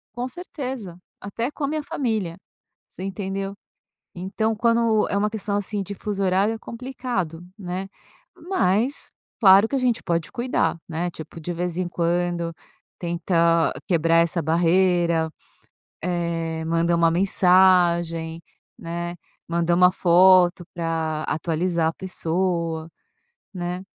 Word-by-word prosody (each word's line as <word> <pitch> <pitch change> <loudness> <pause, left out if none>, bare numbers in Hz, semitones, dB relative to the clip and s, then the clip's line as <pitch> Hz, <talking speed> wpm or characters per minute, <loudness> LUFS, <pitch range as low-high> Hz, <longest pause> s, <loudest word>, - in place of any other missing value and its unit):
Com 245 +1 -2
certeza, 255 - -6 0.2
até 230 +5 -3
com 300 - -7
a 280 - +2
minha 305 +1 -2
família, 220 -12 -2 0.5
você - - -12
entendeu. 195 0 -4 0.6
Então, 220 +5 -1
quando 230 -1 +2
é - - -1
uma 210 +1 +1
questão. 205 -1 -2
assim. 205 0 -2
de 200 - -6
fuso 200 -1 -3
horário, 195 +4 +2
é - - -7
complicado, 235 -10 -4
né. 185 -1 -5 0.6
Mas, 240 - 0 0.3
claro, 200 0 +7
que 275 - -2
a - - +1
gente 245 -3 +1
pode 170 -1 -1
cuidar, 245 +1 0
né, 170 +2 -2
tipo, 160 0 -10
de 175 +2 -4
vez 175 0 -3
em 185 -1 -1
quando, 175 0 -1 0.5
tenta 170 -1 +2 0.2
quebrar 165 -2 +3
essa 170 +1 +2
barreira, 170 0 +2 0.7
eh, 165 -2 -2
mandar 170 +1 +2
uma 165 -1 +4
mensagem, 175 -3 +3 0.4
né, 170 +1 -4 0.3
manda 170 0 +1
uma 180 +1 +5
foto 180 0 +5
pra 160 -2 -2
atualizar 165 +1 0
a 165 - -3
pessoa, 170 -3 -2 0.6
né. 180 0 -4
180 Hz, 130 wpm, -23 LUFS, 170-200 Hz, 0.7 s, claro